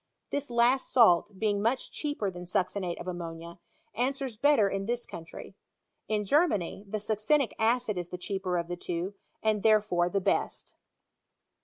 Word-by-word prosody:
This 285 -1 -2
last 240 +2 +2
salt, 205 -4 +5
being 205 -1 0
much 235 +5 0
cheaper 290 -10 -2
than 180 0 -8
succinate 180 0 -1
of - - -7
ammonia, 170 -1 -6 0.3
answers 265 0 -1
better 245 -3 +4
in 195 0 -3
this 240 0 -1
country* 165 +3 -9 0.5
In 210 -1 0
Germany, 205 - +1
the 215 +2 -2
succinic 220 +6 +1
acid 225 -3 +1
is 175 - -5
the 180 - -5
cheaper 185 -1 -2
of 170 -1 -2
the 175 - -3
two, 175 +2 -4 0.3
ana 215 -1 +2
therefore 205 -5 +3
the 195 - 0
best. 185 - -1
205 Hz, 155 wpm, -29 LUFS, 180-235 Hz, 0.5 s, salt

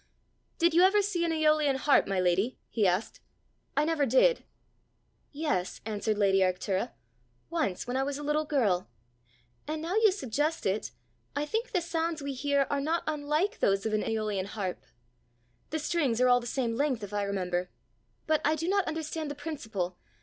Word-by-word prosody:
Did 340 0 +3
you 340 - +5
ever 395 +2 +5
see 370 -4 -1
an 335 - 0
aeolian 305 -3 +3
harp, 275 +2 +3
my 195 -1 0
lady?" 185 +7 +1
he 215 -4 +2
asked: 180 +4 -1 0.6
"I 295 - +4
never 310 -3 +1
did." 265 - +4 0.9
"Yes," 280 - -2
answered 215 0 -1
lady 195 -2 +3
Arctura, 190 +3 0 0.3
" 120 0 -41
once, 305 - -1
when 245 - -3
I 265 - +2
was 280 +1 -2
a 295 - -6
little 300 +1 +1
girl. 215 - +1 0.8
And 310 +1 -2
now 330 +4 -3
you 435 -1 +5
suggest 300 - -1
it, 195 +3 0 0.5
I 290 +1 0
think 450 +9 -2
the 365 -6 +1
sounds 330 -1 -2
we 280 -1 -4
hear 280 +1 +1
are 285 -1 +1
not 325 +4 0
unlike 305 +5 -1
those 195 +1 +2
of 220 - -1
an 215 - +2
aeolian 215 -3 -1
harp! 200 -3 -4 0.9
The 315 - -1
strings 295 -7 0
are 255 - +5
all 245 0 +6
the 240 - -7
same 240 -2 -1
length, 260 -4 0
if 205 0 -7
I 205 - 0
remember. 180 -3 -2 0.6
But 310 -1 +2
I 305 +2 +3
do 325 +2 -3
not 395 0 +2
understand 315 -1 -3
the 290 - -5
principle. 220 - -4
280 Hz, 185 wpm, -29 LUFS, 205-315 Hz, 0.9 s, all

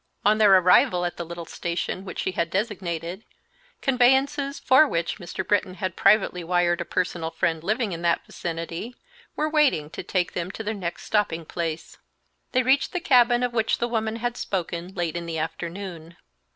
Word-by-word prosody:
On 215 +1 +4
their 210 -2 +6
arrival 180 0 +4
at 175 - -4
the 170 - -3
little 170 0 -7
station 175 +3 -3
which 185 - -7
she - - -1
had 170 -2 -1
designated, 185 -2 -3 0.6
conveyances, 275 +2 +2
for 265 +4 +5
which 170 -2 -2
Mr. 185 +1 -5
Britton 205 -3 +1
had 185 -3 -3
privately 180 -4 +3
wired 175 0 +1
a - - -3
personal 175 -3 -2
friend 165 -1 -1
living 215 +3 0
in 170 -1 -5
that 170 -1 +1
vicinity, 170 +7 -5 0.4
were 305 - 0
waiting 290 - +2
to - - -6
take 180 -2 -1
them 175 0 -3
to 220 - -6
their 215 +1 -2
next 180 -5 -5
stopping 185 -6 0
place. 165 -1 -5 0.5
They 255 0 +2
reached 270 +7 +2
the 360 - 0
cabin 245 -5 +4
of 245 -1 -1
which 225 -2 +1
the 240 - -1
woman 220 -2 -1
had 240 +1 -3
spoken, 175 -1 -3
late 175 -3 -2
in 170 0 -4
the 165 -1 -3
afternoon. 170 +1 -6
185 Hz, 180 wpm, -25 LUFS, 170-235 Hz, 0.6 s, their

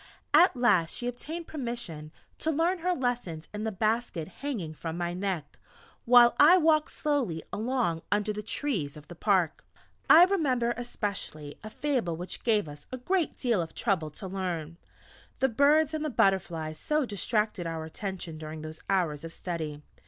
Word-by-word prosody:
At 325 0 +6
last 185 -10 +3
she 240 - -3
obtained 305 +8 -5
permission 235 - -5 0.3
to 320 - 0
learn 335 +4 +1
her 360 +2 0
lessons 240 - -2
in 210 +1 -4
the 220 - -1
basket 215 -5 -1
hanging 220 - -3
from 165 +1 -5
my 175 0 -2
neck, 180 -5 -4 0.5
while 240 0 +7
I 335 +5 +8
walked 315 -3 +3
slowly 265 - -1
along 220 -8 0
under 210 +1 +1
the 210 - -4
trees 205 - -2
of 150 - -14
the - - -7
park. 185 -4 +1 0.5
I 335 +3 +10
remember 260 -11 +1
especially 200 -11 -5
a 215 - -6
Fable 235 - -1
which 180 +1 -5
gave 215 -7 +2
us 145 0 -11
a 255 - -4
great 345 +6 0
deal 235 -8 +1
of 165 -1 -7
trouble 185 -8 0
to 170 +6 -8
learn, 175 -4 -4 0.6
the 265 - +2
birds 290 +5 +4
and 310 -1 -2
the 305 - -1
butterflies 175 - +1
so 300 - +1
distracted 210 -3 -1
our 165 -1 -4
attention 175 -1 -6
during 155 0 -7
those 155 0 -8
hours 165 -7 +1
of 165 - -6
Study! 160 -4 -5
210 Hz, 165 wpm, -29 LUFS, 165-260 Hz, 0.6 s, I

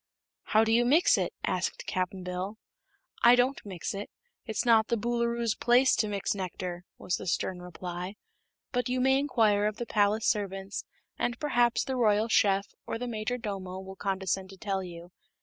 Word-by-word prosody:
"How 220 +1 +4
do 225 - +1
you 235 +1 +5
mix 295 +8 +5
it?" - - -1
asked - - -2
Cap'n 185 +1 -2
Bill. 180 +4 -4 0.6
"I 240 +1 +8
don't 255 +3 +1
mix 185 -5 -5
it; 200 +1 -5 0.4
it's 220 +1 -1
not 225 -2 +5
the 235 - +1
Boolooroo's 235 0 0
place 250 +2 +4
to 215 - +2
mix 200 -1 -1
nectar," 180 -2 -5
was 180 - -2
the - - -8
stern 180 +1 -1
reply. 180 +2 -6 0.6
"But 245 -1 -1
you 255 +1 0
may 265 +1 +4
inquire 220 -7 +2
of 215 - -2
the 240 - -3
palace 210 0 +2
servants 195 -1 -1 0.3
and 240 0 -1
perhaps 240 -5 +2
the 265 -1 -3
Royal 215 -1 +3
Chef 195 -2 +2
or - - -2
the 245 - -4
Majordomo 215 -5 -4
will 190 0 -9
condescend 190 -1 -2
to 195 - -12
tell 195 0 -2
you. 175 0 -10
210 Hz, 175 wpm, -29 LUFS, 190-240 Hz, 0.6 s, I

